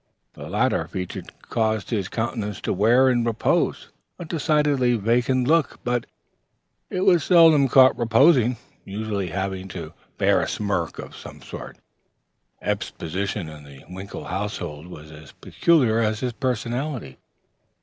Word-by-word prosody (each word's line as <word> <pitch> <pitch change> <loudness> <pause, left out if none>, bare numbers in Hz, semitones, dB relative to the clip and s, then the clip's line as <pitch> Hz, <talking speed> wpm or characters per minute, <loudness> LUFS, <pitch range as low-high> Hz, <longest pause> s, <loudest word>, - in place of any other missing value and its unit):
The - - -9
latter - - 0
feature 90 -1 -5 0.3
caused 110 -2 0
his 100 -5 -1
countenance 110 -2 -3
to - - -1
wear 115 +7 +4
in 120 -2 +2
repose 115 -1 0 0.3
a 175 - -7
decidedly 150 -5 +1
vacant 120 +4 +1
look, 165 -1 +2
but 120 -1 -1 0.8
it 185 - -2
was 180 -5 +4
seldom 160 -5 +6
caught 130 +1 +6
reposing, 120 +1 +4 0.3
usually 100 -1 -3
having 95 +1 -4
to 85 -4 -8 0.2
bear - - +3
a - - -2
smirk 95 -6 -2
of - - -9
some - - -11
sort. - - -9 0.9
Eph's - - -1
position 95 +2 -4
in 75 -1 -11
the 70 -2 -14
Winkle 95 +3 -8
household 90 -6 -5
was 75 -3 -11
as 75 -1 -13
peculiar 130 -10 +2
as 110 -1 0
his 125 -2 -2
personality. 125 - -3
115 Hz, 140 wpm, -23 LUFS, 95-130 Hz, 0.9 s, seldom